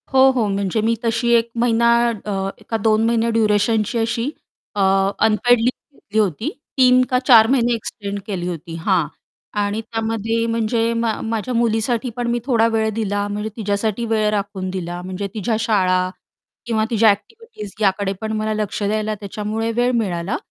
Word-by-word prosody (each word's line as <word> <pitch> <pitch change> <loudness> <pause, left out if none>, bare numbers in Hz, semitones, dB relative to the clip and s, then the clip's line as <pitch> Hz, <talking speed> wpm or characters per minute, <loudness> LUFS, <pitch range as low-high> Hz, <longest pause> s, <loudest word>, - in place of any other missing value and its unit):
हो, 265 0 +7
हो. 245 -5 0
म्हणजे 200 +1 -1
मी 230 +2 +1
तशी 230 +1 0
1 230 0 +2
महिना 235 0 +3 0.2
अ, 200 -3 -3 0.2
का 225 - 0
2 220 0 +2
महिने 230 0 +1
ड्युरेशनची 215 0 +1
अशी 230 +3 -1 0.5
अ, 205 - 0 0.4
अनपेड 235 +3 +3
लीव्ह 250 +4 -3
घेतली 215 +2 -2
होती. 210 - 0 0.3
3 255 -1 +6
का 250 0 +1
4 235 -4 +6
महिने 240 -1 +2
एक्सटेंड 200 -2 -5
केली 180 -4 -3
होती, 165 -1 -6
हां, 170 -1 +1 0.5
आणि 205 +2 -1
त्यामध्ये 225 0 -2
म्हणजे 230 0 0
मा 230 -1 0
माझ्या 225 +2 -3
मुलीसाठी 235 +1 0
पण 240 -1 -1
मी 240 - 0
थोडा 230 -4 +3
वेळ 220 0 +1
दिला 205 -2 -1
म्हणजे 210 +1 -3
तिझ्यासाठी 215 +1 -1
वेळ 220 -2 +1
राखून 200 -2 -3
दिला. 175 -1 -4
म्हणजे 185 +2 -4
तिझ्या 220 +1 -1
शाळा 185 -5 +2 0.6
किंवा 220 -2 0
तिझ्या 225 -2 +4
ॲक्टिव्हिटीज 210 - -4
याकडे 195 -1 +1
पण 220 0 -3
मला 215 0 -1
लक्ष 215 -1 -3
द्यायला 215 +1 -1
त्याच्यामुळे 215 +2 -3
वेळ 245 +2 +1
मिळाला 185 -5 -1
220 Hz, 165 wpm, -20 LUFS, 205-230 Hz, 0.6 s, हो